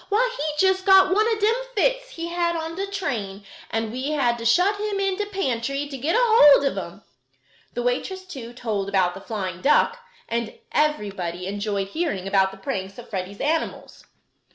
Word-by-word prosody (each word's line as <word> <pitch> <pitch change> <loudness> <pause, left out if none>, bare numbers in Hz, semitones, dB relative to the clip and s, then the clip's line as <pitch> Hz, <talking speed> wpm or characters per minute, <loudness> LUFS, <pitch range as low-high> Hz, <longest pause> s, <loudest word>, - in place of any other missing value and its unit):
Why, - - +2
he 290 - -3 0.2
jest 380 0 +1
got 380 -1 +6
one 430 +3 +3
of 440 - 0
dem 430 +2 +3 0.2
fits - - +1
he 335 -6 -6
had 340 0 0
on 325 0 -4
de 390 +3 -3
train, 215 - -4 0.2
and 225 -1 -2
we 260 +5 -3
had 240 -5 +1
to 230 - -6
shut 365 - +3
him 415 -1 -2
in 390 -1 +1
de 415 +1 -3
pantry 275 - -2
to 285 - -7
get 290 - -1
hold 440 - +6
ob 275 - 0
him." - - -7 0.7
The 245 - -2
waitress, 375 +10 -2
too, 260 -10 -8
told 215 -5 -3
about 185 -3 +2
the 195 - -9
flying 190 -5 -5
duck, 465 - +3 0.3
and 235 - -3
everybody 200 - -1
enjoyed 200 0 -2
hearing 205 - -2
about 195 -1 +3
the 195 - -12
pranks 195 0 -4
of 240 0 -11
Freddie's 190 0 -5
animals. 315 +3 -2
275 Hz, 185 wpm, -24 LUFS, -, 0.7 s, got